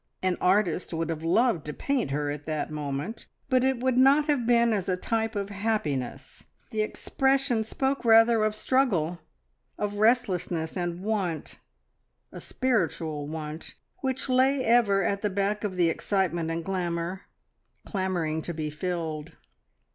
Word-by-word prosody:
An 185 -1 +2
artist 180 -3 +1
would 165 0 -1
have 160 -1 -5
loved 180 - +2
to 150 - -4
paint 275 - -1
her 145 +1 -1
at 145 0 -7
that 155 -1 -3
moment, 150 +7 -4 0.2
but 255 -1 +3
it 265 -2 +1
would 260 -1 +2
not 280 +3 +6
have 285 -6 0
been 235 -1 +4
as 195 -3 -1
a 180 - +1
type 225 +3 -1
of 200 0 -3
happiness. 150 - -3 0.3
The 215 - 0
expression 265 +2 +1
spoke 265 +5 -1
rather 225 -1 +6
of 215 0 +1
struggle, 195 - +1 0.6
of 205 0 -3
restlessness, 185 -8 +1
and 175 0 -3
want 195 -7 -2 0.7
a - - -8
spiritual 165 - -1
want 155 0 -6 0.2
which 260 0 -2
lay 260 +1 +3
ever 220 -4 +4
at 200 0 0
the 210 - 0
back 200 +2 -1
of 200 -3 -2
the 175 -2 +3
excitement 175 -4 -1
and 165 0 -3
glamour, 175 -1 -3 0.6
clamouring 175 -5 -1
to 170 +1 -5
be 155 -1 -3
filled. 160 -2 -4
195 Hz, 150 wpm, -27 LUFS, 165-230 Hz, 0.7 s, not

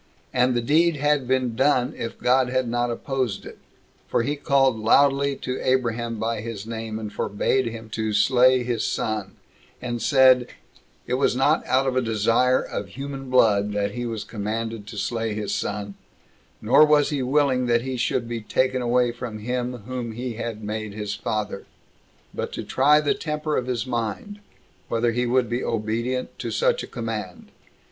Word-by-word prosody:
And 125 0 +2
the 120 - 0
deed 160 +6 +3
had 145 -2 +1
been 130 -2 0
done 130 0 +2
if 115 - -5
God 125 0 +2
had 130 -1 0
not 120 +1 0
opposed 125 -3 -2
it; - - -11 0.5
for 115 - +1
he 145 +5 -1
called 135 -4 +2
loudly 140 +5 +3
to 130 -1 -4
Abraham 120 -2 0
by 110 0 -2
his 110 -2 -6
name, 110 -1 -5
and 105 -1 -6
forbade 130 +5 0
him 115 -1 -7
to 110 0 -2
slay 125 +4 +4
his 120 -2 -1
son; 105 -3 -2 0.4
and 120 -1 -4
said, 130 -3 +5 0.6
"It 125 - -3
was 135 - +2
not 140 +4 +2
out 130 +1 +2
of 130 -1 0
a 130 - +3
desire 115 +3 +2
of 100 - -5
human 135 +4 -7
blood 105 -5 +3
that 100 0 -1
he 120 +3 -4
was 115 -2 -4
commanded 110 0 -4
to 105 - -8
slay 115 0 -2
his 105 -1 -3
son, 105 0 -3 0.7
nor 120 +7 +6
was 150 -1 +4
he 145 -2 -1
willing 130 -1 +2
that 120 0 +2
he 130 0 -3
should 120 -1 -1
be 115 -1 -4
taken 130 +4 0
away 120 0 +2
from 120 -2 -6
him 125 +1 -3
whom 125 -2 -4
he 120 +1 -4
had 110 -1 -5
made 105 -1 -4
his 105 -1 -3
father, 105 -2 -3 0.7
but - - -4
to - - -4
try 145 +3 +4
the 150 -1 +1
temper 150 -1 -3
of 125 - -1
his 125 -1 -1
mind, 120 - -4 0.5
whether 115 +1 +1
he 125 +1 0
would 125 0 +2
be 120 +3 -2
obedient 115 +3 -2
to - - -3
such - - +1
a - - -7
command. - - -6
120 Hz, 180 wpm, -24 LUFS, 110-130 Hz, 0.7 s, nor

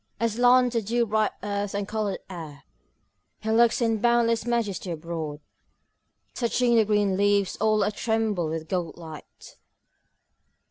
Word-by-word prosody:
Aslant 245 +2 +3
the 230 - +1
dew 235 +3 0
bright 215 -1 +1
earth 205 -1 -3
and 200 -1 -2
coloured 210 -3 -3
air 160 -6 -9 0.8
he 220 - -3
looks 235 +2 +3
in 225 -1 +1
boundless 235 -1 +2
majesty 220 -6 -1
abroad, 160 -2 -5 0.9
touching 240 0 +1
the 225 -2 +4
green 205 -2 +1
leaves 200 -1 +2
all 215 0 +2
a - - 0
tremble 215 -6 -1
with 160 0 -4
gold 175 -3 -3
light. 160 -3 -12
210 Hz, 135 wpm, -25 LUFS, 185-230 Hz, 0.9 s, the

